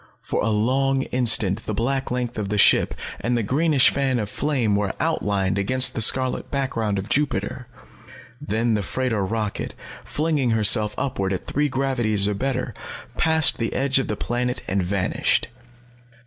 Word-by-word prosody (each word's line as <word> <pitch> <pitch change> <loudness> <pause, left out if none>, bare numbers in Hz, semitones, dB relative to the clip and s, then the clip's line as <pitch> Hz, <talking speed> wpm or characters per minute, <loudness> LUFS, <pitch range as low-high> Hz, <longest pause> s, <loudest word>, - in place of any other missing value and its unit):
For - - -2
a 110 - 0
long 135 +5 +1
instant 110 -7 +2
the 110 - -2
black 135 +5 -1
length 120 -2 -3
of 100 -2 -3
the 105 - -1
ship, - - +4 0.2
and 120 +3 -1
the 115 - -1
greenish 145 +4 +3
fan 135 -2 0
of 105 -3 -3
flame, 130 -8 0
were 100 -1 -1
outlined 100 -1 0
against 130 +6 +2
the - - -2
scarlet 130 +3 +3
background 115 -7 -2
of 95 +1 -4
Jupiter. 130 -3 -1 0.7
Then 115 -4 0
the 105 - 0
freighter 115 +1 -2
rocket, 105 +1 -3 0.3
flinging 150 -4 -1
herself 105 0 +3
upward 100 -8 -2
at 95 - -5
three 150 +1 0
gravities 120 -7 0
or 105 - 0
better, 130 +1 -3 0.4
passed 160 -1 +3
the 115 - -2
edge 135 0 +2
of 135 - -2
the 105 - -3
planet 125 +1 -2
and 95 +1 0
vanished. 90 +1 0
120 Hz, 160 wpm, -22 LUFS, 105-135 Hz, 0.7 s, ship